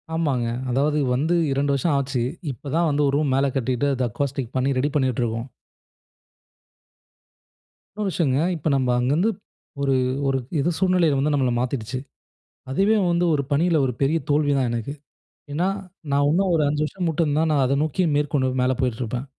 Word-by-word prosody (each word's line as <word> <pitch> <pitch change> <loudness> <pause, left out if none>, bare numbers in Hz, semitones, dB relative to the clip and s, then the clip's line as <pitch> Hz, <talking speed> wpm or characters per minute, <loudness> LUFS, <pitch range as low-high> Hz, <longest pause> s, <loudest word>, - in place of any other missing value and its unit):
ஆமாங்க. 135 -8 0 0.2
அதாவது 150 +4 +1
வந்து 155 +7 +1 0.2
2 140 +1 +1
வருஷம் 145 +2 +1
ஆச்சு. 135 -3 -1 0.3
இப்ப 135 +3 -9
தான் 170 0 +2
வந்து 145 0 +1
1 140 - +1
ரூம் 145 -3 +1
மேல 135 +1 +2
கட்டிட்டு 130 +2 0
அத 125 0 0
அக்வாஸ்டிக் 130 0 -3
பண்ணி 130 +1 +1
ரெடி 140 +3 +1
பண்ணிட்டு 130 -4 +1
இருக்கோம். 115 +1 -3 2.5
இன்னொரு 210 -2 -2
விஷயங்க, 140 -7 +1 0.2
இப்ப 155 -1 -2
நம்ம 130 -2 +1
அங்கருந்து 150 - +2 0.5
ஒரு 135 -1 +2 0.3
ஒரு 135 -1 +1 0.2
எதோ 170 +5 +1
சூழ்நிலையில 180 -6 +3
வந்து 150 +2 +1
நம்மள 130 -3 +1
மாத்திடுச்சு. 125 0 -3 0.7
அதுவே 200 +10 +3
வந்து 175 +1 +2
ஒரு 140 - +1
பணியில 165 +3 +2
ஒரு 125 - -1
பெரிய 155 +4 +2
தோல்வி 145 0 +2
தான் 130 -2 +1
எனக்கு. 120 +4 -3 0.6
ஏனா, 170 +5 +1 0.4
நான் 145 +1 +3
உன்னும் 185 +4 +2
ஒரு 155 - +2
5 150 +1 0
வருஷம் 175 +2 -3 0.2
இருந்தா 150 +1 +1
நான் 145 -3 +3
அத 140 +2 +1
நோக்கி 155 +4 0
மேற்கொண்டு 145 -3 0
மேல 130 +1 +2
போயிட்டு 125 -2 -1
இருப்பேன். 120 +3 -4
140 Hz, 165 wpm, -23 LUFS, 130-155 Hz, 2.5 s, சூழ்நிலையில